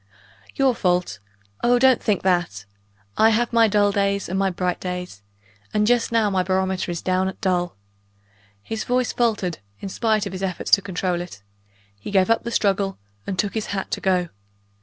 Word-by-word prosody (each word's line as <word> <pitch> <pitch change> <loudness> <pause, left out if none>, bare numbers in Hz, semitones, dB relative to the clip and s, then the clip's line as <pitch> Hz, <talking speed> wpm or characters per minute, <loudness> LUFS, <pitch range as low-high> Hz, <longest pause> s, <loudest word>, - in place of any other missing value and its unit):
"Your 270 -2 +3
fault? 180 - 0 0.4
oh, 245 +1 +4
don't 260 0 +4
think 205 -3 0
that! 175 - 0 0.5
I 220 - +7
have 235 +2 +1
my 230 -1 +5
dull 205 -1 +3
days 200 0 0
and 190 +2 -2
my 195 0 +2
bright 180 0 -2
days 180 - -5 0.5
and 210 0 +3
just 240 +1 +2
now 225 -2 +3
my 190 -1 +2
barometer 190 0 -1
is 170 - -5
down 185 0 +1
at 190 - -6
dull." 180 -2 0 0.9
His 220 - -4
voice 250 0 0
faltered, 210 -8 0 0.2
in 195 - -6
spite 215 +1 0
of 200 - -5
his 185 - -6
efforts 190 -2 -3
to 200 - +7
control 180 -2 -2
it; 135 - -10 0.6
he - - -7
gave 190 +1 +3
up 230 - +3
the 235 - -3
struggle, 195 -3 0 0.3
and 190 - -3
took 200 +1 0
his 220 -2 -3
hat 190 - -4
to - - -2
go. 180 -2 +1
195 Hz, 185 wpm, -22 LUFS, 180-220 Hz, 0.9 s, I